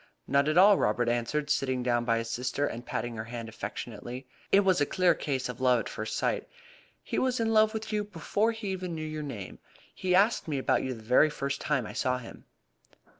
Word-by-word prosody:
"Not 140 +1 +3
at 155 - +1
all," 200 +2 +7
Robert 115 +3 +1
answered, 120 +6 0
sitting 130 -2 0
down 120 -1 +1
by 115 -1 +2
his 115 0 -3
sister, 125 +4 -1
and 120 -3 -5
patting 120 -1 -3
her 110 - -4
hand 115 0 -6
affectionately. 115 +3 -7 0.3
"It 200 - +6
was 190 -5 +2
a - - +4
clear 185 -2 +3
case 135 -4 -2
of 125 0 -7
love 125 -2 +4
at - - -7
first - - -4
sight. - - -1 0.5
He - - -2
was 255 -1 +1
in 225 -1 +1
love 215 0 +5
with 220 0 -5
you 210 0 +1
before 205 +3 0
he 220 -4 -4
ever 185 -1 -4
knew 160 -2 -4
your 155 0 -4
name. 115 -10 -7 0.3
He 180 -1 0
asked 205 +2 +3
me 150 -3 -1
about 130 - +1
you 130 -1 -3
the 110 - -12
very 125 +7 +5
first 140 -2 -3
time 140 -6 0
I - - -7
saw 125 0 0
him." 125 - -11
140 Hz, 225 wpm, -29 LUFS, 120-185 Hz, 0.5 s, all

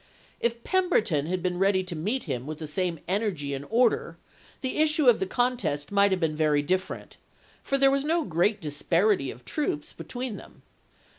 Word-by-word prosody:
If 235 0 -1
Pemberton 225 - +1
had 180 0 -2
been 180 -1 -1
ready 195 -1 +3
to 180 -2 -5
meet 210 +11 -1
him 130 -4 -4
with 155 0 -5
the 160 - -6
same 175 +2 -2
energy 185 -8 -1
and 140 +1 -5
order, 235 +1 +2 0.4
the 260 - -2
issue 305 -1 +3
of 240 - +6
the 190 - -1
contest 240 - -1
might 200 0 +4
have 190 -1 0
been 160 -3 0
very 150 -2 +2
different, 185 +5 -3 0.4
for 275 - 0
there 275 0 +5
was 275 0 +1
no 325 +2 +1
great 180 +5 +1
disparity 165 +1 +1
of 125 - -9
forces 150 - -3
between 245 +7 -5
them. - - -15
190 Hz, 180 wpm, -27 LUFS, 155-245 Hz, 0.4 s, of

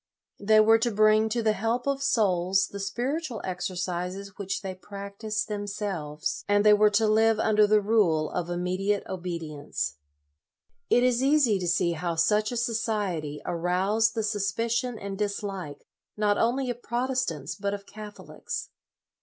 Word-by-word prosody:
They 215 +2 +4
were 225 +1 +6
to 240 +1 +1
bring 215 0 +4
to 230 +1 -1
the 215 -1 +3
help 225 +4 -1
of 275 -1 -1
souls 195 -6 +2
the 200 - -7
Spiritual 245 +5 -3
Exercises 185 +1 -4
which 200 0 -4
they 190 -1 -4
practised 200 +2 -5
themselves, 200 -7 -4
and 205 0 +3
they 210 - +8
were 210 0 +5
to 210 +2 +2
live 220 +1 +4
under 215 -1 +4
the 210 0 +4
rule 195 -8 +2
of 175 -1 -3
immediate 185 +3 -1
obedience. 155 - -4 0.9
72 - - +4
LOYOLA 245 - +4
It - - +5
is 250 0 +1
easy 270 -8 +3
to 180 - -3
see 175 0 +2
how 170 +1 -2
such 210 +6 +2
a 245 - -3
society 205 -10 -2
aroused 190 +6 +1
the 220 - -1
suspicion 230 +4 -1
and 200 -1 -6
dislike, 195 -7 -4 0.3
not 210 -1 +2
only 250 +2 +1
of 240 0 -8
Protestants, 240 - -2
but 200 0 -2
of 200 0 -11
Catholics. 210 0 -7
205 Hz, 155 wpm, -27 LUFS, 185-225 Hz, 0.9 s, they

